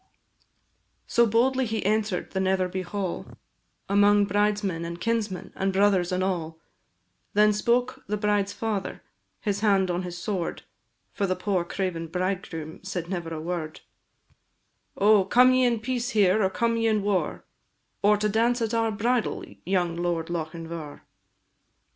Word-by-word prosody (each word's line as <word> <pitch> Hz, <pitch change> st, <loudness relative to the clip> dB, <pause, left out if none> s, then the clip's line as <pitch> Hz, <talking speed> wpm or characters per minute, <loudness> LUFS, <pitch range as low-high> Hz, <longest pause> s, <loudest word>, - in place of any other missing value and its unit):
So 235 Hz, 0 st, +3 dB
boldly 255 Hz, +4 st, +2 dB
he 220 Hz, -2 st, -2 dB
enter'd 210 Hz, -2 st, 0 dB
the 190 Hz, -, -2 dB
Netherby 185 Hz, -1 st, 0 dB
Hall, 185 Hz, 0 st, -4 dB, 0.6 s
Among 205 Hz, +1 st, +4 dB
bridesmen, 205 Hz, -3 st, 0 dB
and 170 Hz, +1 st, -6 dB
kinsmen, 220 Hz, -4 st, -2 dB
and 195 Hz, 0 st, 0 dB
brothers, 190 Hz, -2 st, +3 dB
and 185 Hz, 0 st, 0 dB
all: 165 Hz, -4 st, -2 dB, 0.8 s
Then 210 Hz, 0 st, +5 dB
spoke 245 Hz, +4 st, 0 dB
the 210 Hz, +1 st, -1 dB
bride's 205 Hz, -1 st, +1 dB
father, 210 Hz, -2 st, -3 dB, 0.4 s
his 205 Hz, -2 st, -1 dB
hand 195 Hz, -3 st, +3 dB
on 175 Hz, +1 st, -1 dB
his 175 Hz, -1 st, -6 dB
sword, 180 Hz, -1 st, -3 dB, 0.5 s
(For 200 Hz, -, -1 dB
the 185 Hz, -, 0 dB
poor 185 Hz, -1 st, 0 dB
craven 175 Hz, -2 st, -3 dB
bridegroom 180 Hz, -3 st, -4 dB
said 180 Hz, -3 st, -4 dB
never 175 Hz, -3 st, -4 dB
a 160 Hz, -, -4 dB
word) 160 Hz, -1 st, -4 dB, 1.2 s
"Oh, 205 Hz, 0 st, +5 dB
come 250 Hz, +6 st, +5 dB
ye 255 Hz, 0 st, +4 dB
in 235 Hz, -2 st, +2 dB
peace 245 Hz, +1 st, -2 dB
here, 210 Hz, -3 st, +3 dB
or 190 Hz, -, +3 dB
come 230 Hz, +3 st, 0 dB
ye 225 Hz, 0 st, +1 dB
in 215 Hz, -2 st, +1 dB
war, 200 Hz, -3 st, -1 dB, 0.6 s
Or 210 Hz, +1 st, +4 dB
to 210 Hz, +1 st, 0 dB
dance 230 Hz, +4 st, +2 dB
at 225 Hz, 0 st, -2 dB
our 225 Hz, -1 st, +2 dB
bridal, 235 Hz, +3 st, 0 dB, 0.2 s
young 180 Hz, -3 st, +1 dB
Lord 170 Hz, -1 st, -2 dB
Lochinvar?" 165 Hz, -2 st, -6 dB
195 Hz, 150 wpm, -26 LUFS, 180-215 Hz, 1.2 s, Then